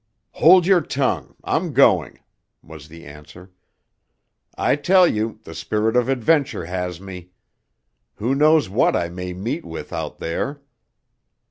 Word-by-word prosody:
"Hold 180 Hz, +2 st, +5 dB
your 185 Hz, -2 st, +4 dB
tongue! 130 Hz, -, -2 dB
I'm -, -, -2 dB
going," -, -, +3 dB, 0.4 s
was 75 Hz, -1 st, -13 dB
the 85 Hz, +1 st, -14 dB
answer. 75 Hz, +5 st, -14 dB, 1.1 s
"I -, -, +1 dB
tell 185 Hz, +5 st, +4 dB
you, 110 Hz, -4 st, -2 dB
the -, -, -10 dB
spirit 110 Hz, +2 st, -2 dB
of 125 Hz, 0 st, +2 dB
adventure 135 Hz, -, 0 dB
has 90 Hz, -1 st, -4 dB
me. 90 Hz, -2 st, -10 dB, 0.9 s
Who 120 Hz, +5 st, -2 dB
knows 150 Hz, +1 st, +3 dB
what 100 Hz, +6 st, +1 dB
I 85 Hz, -, -1 dB
may 90 Hz, +1 st, -6 dB
meet 115 Hz, -, -4 dB
with 80 Hz, -, -9 dB
out -, -, -5 dB
there?" 140 Hz, -, -4 dB
110 Hz, 135 wpm, -21 LUFS, 90-145 Hz, 1.1 s, Hold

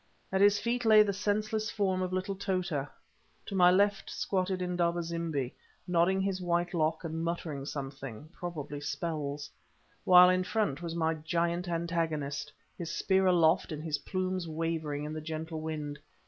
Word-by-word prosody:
At 190 Hz, 0 st, +1 dB
his 205 Hz, 0 st, +6 dB
feet 235 Hz, +3 st, -1 dB
lay 215 Hz, -1 st, +7 dB
the 200 Hz, -1 st, -1 dB
senseless 215 Hz, +2 st, -1 dB
form 190 Hz, -3 st, 0 dB
of 185 Hz, -1 st, -2 dB
little 185 Hz, +1 st, -1 dB
Tota, 185 Hz, -7 st, -2 dB, 0.6 s
to -, -, -7 dB
my 180 Hz, -1 st, +7 dB
left 200 Hz, +2 st, +2 dB
squatted 185 Hz, -1 st, -1 dB
Indaba 175 Hz, -1 st, 0 dB
zimbi, 165 Hz, -6 st, -2 dB, 0.3 s
nodding 180 Hz, +2 st, +3 dB
his 190 Hz, -1 st, -1 dB
white 175 Hz, 0 st, 0 dB
lock 160 Hz, 0 st, 0 dB
and 165 Hz, 0 st, -3 dB
muttering 165 Hz, -5 st, -3 dB
something—probably 145 Hz, +3 st, -6 dB
spells; 145 Hz, -1 st, -3 dB, 0.5 s
while 180 Hz, 0 st, +8 dB
in 185 Hz, 0 st, +2 dB
front 180 Hz, -7 st, -1 dB
was 170 Hz, -1 st, -4 dB
my 160 Hz, -1 st, +1 dB
giant 170 Hz, +3 st, -1 dB
antagonist, 160 Hz, -4 st, -2 dB, 0.2 s
his 170 Hz, -2 st, -5 dB
spear 190 Hz, +2 st, +2 dB
aloft 175 Hz, 0 st, +4 dB
and 155 Hz, 0 st, -5 dB
his 155 Hz, -3 st, -1 dB
plumes 185 Hz, -2 st, -2 dB
wavering 160 Hz, -2 st, -2 dB
in 150 Hz, +1 st, -4 dB
the 155 Hz, -, -4 dB
gentle 160 Hz, 0 st, -5 dB
wind. 150 Hz, -2 st, -4 dB
170 Hz, 155 wpm, -31 LUFS, 155-185 Hz, 0.6 s, while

